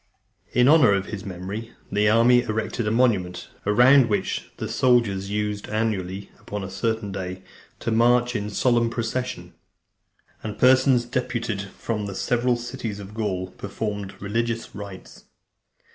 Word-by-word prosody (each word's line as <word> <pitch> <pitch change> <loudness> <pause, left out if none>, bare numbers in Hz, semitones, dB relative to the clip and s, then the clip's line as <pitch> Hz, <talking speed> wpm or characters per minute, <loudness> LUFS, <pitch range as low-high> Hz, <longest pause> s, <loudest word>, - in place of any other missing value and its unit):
In 125 +1 +4
honour 150 -8 +6
of 100 -1 0
his 105 -3 -6
(296) - - -12
memory, 95 +5 -6
the 105 +1 +3
army 120 +3 +5
erected 110 0 -2
a - - +3
monument, 105 -7 +1 0.2
round 125 +4 +6
which 100 -3 -1
the - - -4
soldiers 110 -6 +2
used, 105 0 -2
annually, 100 -3 -2
upon 105 -1 -6
a 95 - -6
certain 110 +1 -2
day, 95 -1 -5 0.4
to 115 - -1
march 120 +2 +3
in 105 -1 -2
solemn 120 +2 +2
procession, 115 -6 -3 0.9
and 105 -1 -6
persons 130 0 +5
deputed 115 -4 -2
from 105 +2 -4
the 100 - -6
several 120 +3 +1
cities 120 -3 -5
of 100 +1 -9
Gaul 95 -4 -2
performed 100 0 -5
religious 115 +3 -2
rites. 100 -2 -10
110 Hz, 145 wpm, -24 LUFS, 100-120 Hz, 0.9 s, honour